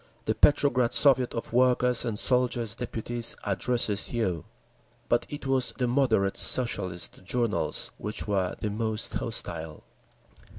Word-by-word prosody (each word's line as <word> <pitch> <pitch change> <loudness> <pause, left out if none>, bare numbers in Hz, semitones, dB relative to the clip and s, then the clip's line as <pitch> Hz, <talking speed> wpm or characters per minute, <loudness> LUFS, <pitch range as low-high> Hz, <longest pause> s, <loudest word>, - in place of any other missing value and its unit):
"The - - +1
Petrograd 130 -5 +3
Soviet 130 -4 +4
of 115 - -5
Workers' 125 -1 +3
and 115 -3 -2
Soldiers' 120 -2 +1
Deputies 120 0 -2
addresses 105 +1 0
you." 95 - -2 0.6
But - - +1
it 145 -1 -7
was 135 -2 +1
the 125 - 0
"moderate" 120 -7 +1
Socialist 95 -9 0
journals 115 +3 -1
which 105 +1 -4
were 95 -3 -1
the 105 - -3
most 110 0 -2
hostile. 85 -10 -4
115 Hz, 125 wpm, -27 LUFS, 105-125 Hz, 0.6 s, Soviet